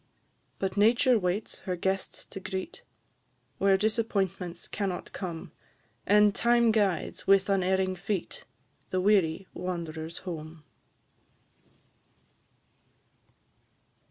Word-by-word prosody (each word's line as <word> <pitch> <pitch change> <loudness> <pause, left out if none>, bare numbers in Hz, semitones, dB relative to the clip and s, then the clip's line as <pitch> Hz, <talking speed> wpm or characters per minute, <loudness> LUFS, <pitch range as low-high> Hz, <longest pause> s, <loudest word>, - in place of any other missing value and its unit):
But 190 +1 -2
Nature 235 +3 +5
waits 185 +3 -2
her 185 -2 -3
guests 190 +2 -2
to - - -8
greet, 190 - -5 0.8
Where 195 0 +4
disappointments 195 -5 -1
cannot 195 -3 -3
come, 170 -4 -5 0.6
And 210 0 +6
Time 235 0 +4
guides, 205 -5 0
with 195 0 +5
unerring 190 -1 +2
feet, 190 +1 -3 0.4
The 185 - 0
weary 190 -3 +3
wanderers 165 -2 -5
home. 160 -2 -7
190 Hz, 90 wpm, -29 LUFS, 180-210 Hz, 0.8 s, And